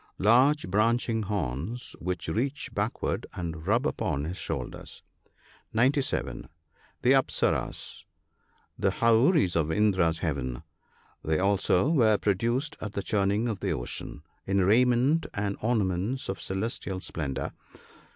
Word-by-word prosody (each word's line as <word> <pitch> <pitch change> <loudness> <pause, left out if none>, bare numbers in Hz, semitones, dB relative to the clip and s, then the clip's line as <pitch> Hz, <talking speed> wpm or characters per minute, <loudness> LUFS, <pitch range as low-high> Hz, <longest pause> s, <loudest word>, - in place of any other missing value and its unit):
— - - -38
Large 130 +8 +4
branching 115 +2 +2
horns 100 - -3
which 90 -1 -3
reach 130 - -2
backward - - -2
and 80 -2 -5
rub 120 +7 +2
upon 80 - -1
his 85 +4 -4
shoulders. - - -6 0.7
(97.). 130 +4 +1 0.5
The 125 - +5
Apsarasas. 135 -1 0 0.4
— - - -35
The 95 - +5
houris 115 - +3
of 80 -1 +1
Indra's 95 -4 +2
heaven. 70 -7 -3 0.6
They 80 0 +1
also 95 - +2
were 115 -10 +4
produced 120 - 0
at 105 -1 -5
the 100 - -3
churning 100 +3 +1
of 110 -5 -3
the - - -1
ocean, 65 +4 -5 0.2
in 95 0 +2
raiment 125 - +3
and 100 -1 -1
ornaments 110 +1 0
of 95 - -4
celestial 95 -1 -3
splendour. 75 -7 -4
100 Hz, 125 wpm, -28 LUFS, 90-120 Hz, 0.7 s, The